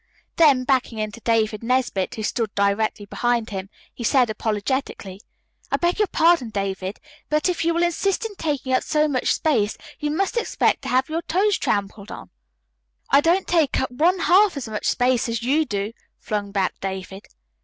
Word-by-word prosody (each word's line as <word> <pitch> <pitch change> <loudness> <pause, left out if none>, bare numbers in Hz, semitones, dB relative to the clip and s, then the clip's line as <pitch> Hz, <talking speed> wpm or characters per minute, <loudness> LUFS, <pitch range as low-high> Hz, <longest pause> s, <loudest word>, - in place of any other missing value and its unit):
Then 285 -6 +5
backing 255 -3 0
into 215 0 -4
David 220 -2 0
Nesbit, 240 -6 0
who 220 - -5
stood 220 0 -2
directly 200 +1 0
behind 235 +1 -1
him, 195 -1 -5 0.2
he 240 - -8
said 245 -1 +3
apologetically: 210 -2 -3 0.5
"I - - +2
beg 345 +3 0
your 420 - +3
pardon, 330 -8 +3
David, 195 -1 -3 0.3
but 305 +3 +1
if 355 -2 -1
you 335 - +2
will 340 +1 +1
insist 380 +5 0
in 445 - -5
taking 290 -7 -2
up 255 - +3
so 305 0 +1
much 265 -4 0
space 225 -10 +1 0.2
you 300 -1 -2
must 385 +9 -1
expect 470 - +1
to - - -6
have 255 +1 +2
your 320 +2 -2
toes 385 +5 +1
trampled 200 0 -2
upon." - - -9 0.8
"I 280 - +6
don't 345 +5 +2
take 325 -5 +2
up 265 - -2
one 340 +8 +2
half 380 -2 +4
as 265 - -5
much 215 -1 -3
space 245 -1 +1
as 230 0 -3
you 295 +6 +2
do," 205 -2 -3 0.2
flung 205 -2 -3
back 195 -2 0
David. 190 0 -6
250 Hz, 180 wpm, -22 LUFS, 210-320 Hz, 0.8 s, I